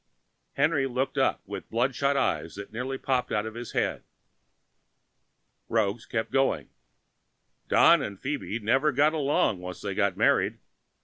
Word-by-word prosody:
Henry 140 -1 +2
looked 130 +1 -2
up - - +1
with - - -7
bloodshot 135 +4 +1
eyes 85 -8 -1
nearly 125 +4 -3
popping 125 -4 0
out 105 - -1
of 110 - -6
his 120 +1 -7
head. - - -1 1.7
Roggs 110 +1 0
kept 110 -1 -2
going. 135 0 +1 1.0
"Don 170 -2 +6
and 100 -7 -5
Phoebe 135 -6 -3
never 130 +7 +2
got 145 +4 +3
along 140 - +1
once 90 0 -8
they - - -3
were - - +2
married. - - +2
125 Hz, 135 wpm, -27 LUFS, 110-140 Hz, 1.7 s, Don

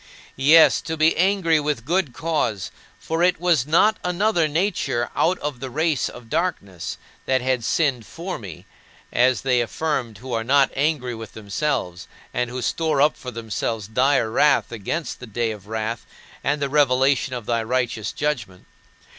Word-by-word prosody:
Yes, 155 +5 +6
to 160 0 -4
be 155 +1 +4
angry 180 -3 +3
with 145 -6 -2
good 170 -2 +1
cause, 120 - -2 0.3
for 165 +1 -3
it 180 -1 +3
was 165 -7 +2
not 210 +8 +4
another 180 -1 +1
nature 145 -7 -1
out 180 +3 +2
of 145 -4 -4
the 130 +1 -5
race 155 +2 0
of 120 -1 -12
darkness 150 - -3 0.3
that 130 -1 +2
had 130 -2 0
sinned 130 -5 0
for 180 +3 -6
me 90 -4 -10 0.5
as 125 +1 +3
they 125 -2 +2
affirm 125 -2 -2
who 125 +5 -7
are 115 -1 0
not 135 +3 +3
angry 140 -3 0
with 110 -2 -9
themselves, 105 -3 -3 0.3
and 125 -1 -1
who 125 0 -5
store 155 +2 0
up 150 +2 +4
for 125 - -8
themselves 115 -2 -3
dire 125 0 +2
wrath 150 +3 +3
against 120 - -4
the 125 - -9
day 115 +1 -1
of 105 -2 -10
wrath 110 +1 -4 0.4
and 145 +2 0
the - - +1
revelation 135 -2 +2
of 120 -3 -6
thy 115 0 0
righteous 120 -2 -1
judgment. 115 -12 -3
130 Hz, 165 wpm, -22 LUFS, 115-155 Hz, 0.5 s, Yes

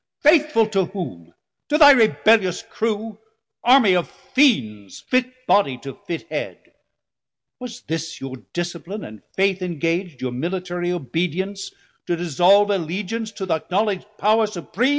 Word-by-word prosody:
Faithful 300 -6 +4
to 195 -3 0
whom? 130 - -7 0.4
to 300 - +3
thy 290 -2 +9
rebellious 220 -6 +3
crew? 220 -1 -3 0.4
Armie 245 -6 +6
of 175 - 0
Fiends, 110 - 0
fit 255 -1 +1 0.2
body 170 - +2
to 135 +3 -8
fit 165 +6 -6
head; - - -6 0.9
Was 245 -1 -8
this 165 +1 -5
your 135 -1 -7
discipline 175 +4 -5
and 110 -1 -11
faith 190 -1 +2
ingag'd, 170 -2 -2
Your 130 -1 -3
military 175 +5 -3
obedience, 180 +6 -3 0.4
to 175 - +1
dissolve 180 +5 +3
Allegeance 200 +5 -3
to 195 - -5
th' 185 - -5
acknowledg'd 200 +1 -1
Power 215 +1 +3
supream? 210 +6 -1
190 Hz, 130 wpm, -21 LUFS, 170-220 Hz, 0.9 s, thy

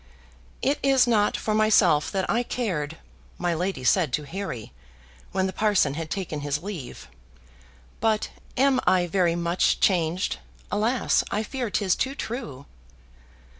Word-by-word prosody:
"It 280 +2 +1
is 270 -2 +4
not 215 -4 +2
for 215 - -2
myself 210 -8 +4
that 190 -1 -1
I 235 - +2
cared," 170 -12 -3 0.4
my 175 -1 0
lady 180 -2 -2
said 160 +2 +3
to 150 - 0
Harry, 145 - -6 0.6
when 190 0 0
the 190 - -3
parson 200 -9 +2
had 160 +1 -5
taken 180 -6 -3
his 145 +2 -2
leave; 175 -11 -7 0.9
"but 220 -1 +1 0.3
AM 265 0 +4
I 180 -1 +4
very 175 -1 +1
much 170 +1 +1
changed? 170 - +1 0.3
Alas! 230 +4 +2
I 210 - -1
fear 245 +1 -3
'tis 195 -2 +1
too 270 +1 -2
true." 220 - -6
190 Hz, 140 wpm, -25 LUFS, 160-220 Hz, 0.9 s, is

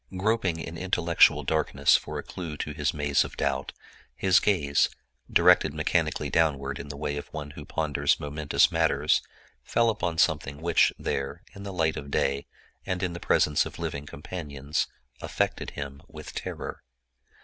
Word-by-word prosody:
Groping 100 -3 +1
in 80 0 -6
intellectual 90 -2 +4
darkness 80 -2 +3
for - - -2
a - - -4
clew 85 -5 -6
to 75 - -4
his 75 0 0
maze 75 -2 +2
of - - -9
doubt, 70 0 -1 0.4
his 95 -2 +4
gaze, 75 -9 +2 0.4
directed - - +5
mechanically - - 0
downward 70 -4 +1
in 70 - -7
the 70 0 -7
way 75 -1 -2
of 70 - -6
one 75 -1 -7
who 75 0 -10
ponders 80 -3 0
momentous 75 0 +2
matters, - - +2 0.4
fell 115 -1 +2
upon 85 -6 -2
something 75 -4 +1
which, 85 +1 +4
there, 70 0 -3
in 100 - -10
the 100 0 -6
light 80 -4 0
of 70 - -7
day 70 0 0 0.4
and 95 0 -2
in 90 -2 -1
the 85 - -6
presence 75 -3 +3
of - - -8
living 70 +1 -4
companions, 75 -2 -3 0.3
affected - - -1
him 70 0 -6
with - - -10
terror. - - -5
75 Hz, 160 wpm, -27 LUFS, 70-85 Hz, 0.4 s, directed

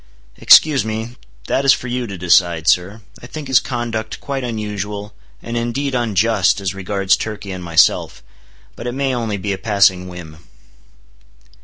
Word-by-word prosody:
"Excuse 145 -7 +6
me, 110 +2 -5 0.3
that 135 - 0
is 135 - +6
for 125 - -5
you 125 0 -3
to 100 -2 -7
decide, 85 -2 +2
sir. 100 +5 +1 0.2
I 125 - -10
think 150 +2 -8
his 130 -1 +5
conduct 120 -3 -4
quite 135 -2 -4
unusual, 105 -3 -5 0.3
and 115 - -5
indeed 120 +4 -2
unjust, 110 -4 +1
as 95 -2 -3
regards 95 0 0
Turkey 105 -2 -6
and 90 -1 -6
myself. 85 -1 +2 0.5
But 120 - -7
it 120 - -3
may 135 0 -1
only 115 -4 -2
be 100 +1 -3
a 95 - -6
passing 100 -4 +2
whim." 85 -4 -10
105 Hz, 160 wpm, -18 LUFS, 95-120 Hz, 0.5 s, Excuse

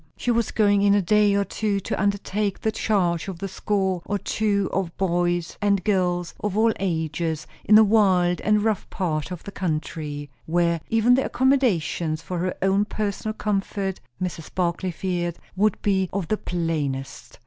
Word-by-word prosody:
She 245 - 0
was 230 -1 +1
going 205 -2 +3
in 200 0 +4
a 205 - +3
day 205 +2 +4
or 200 - +2
two 205 -1 -1
to - - -3
undertake 200 0 -1
the 220 - +1
charge 185 -6 0
of 190 -1 -6
a - - -1
score 190 -2 -1
or 205 - -1
two 200 -1 0
of 185 -3 -2
boys 175 -2 0
and 200 -2 +2
girls, 180 -3 0
of 210 -1 -2
all 225 +1 +4
ages, 160 -3 -2 0.2
in 215 - +7
a 220 - +8
wild 190 -5 +3
and 210 0 +2
rough 220 -3 -1
part 155 -4 -2
of 180 -3 -7
the 200 - -7
country; 155 -5 -4 0.2
where 170 0 +1
even 225 +2 +4
the 265 +2 +3
accommodations 185 - +1
for 175 +2 -4
her 185 +1 -1
own 195 +2 +3
personal 215 0 -3
comfort, 195 -2 -2 0.2
Mrs. 175 -3 -4
Barclay 180 0 0
feared, 175 -1 -2 0.2
would 210 +1 +2
be 190 -3 +1
of 195 -4 -3
the 215 - +1
plainest. 150 -7 -3
190 Hz, 170 wpm, -24 LUFS, 170-205 Hz, 0.2 s, a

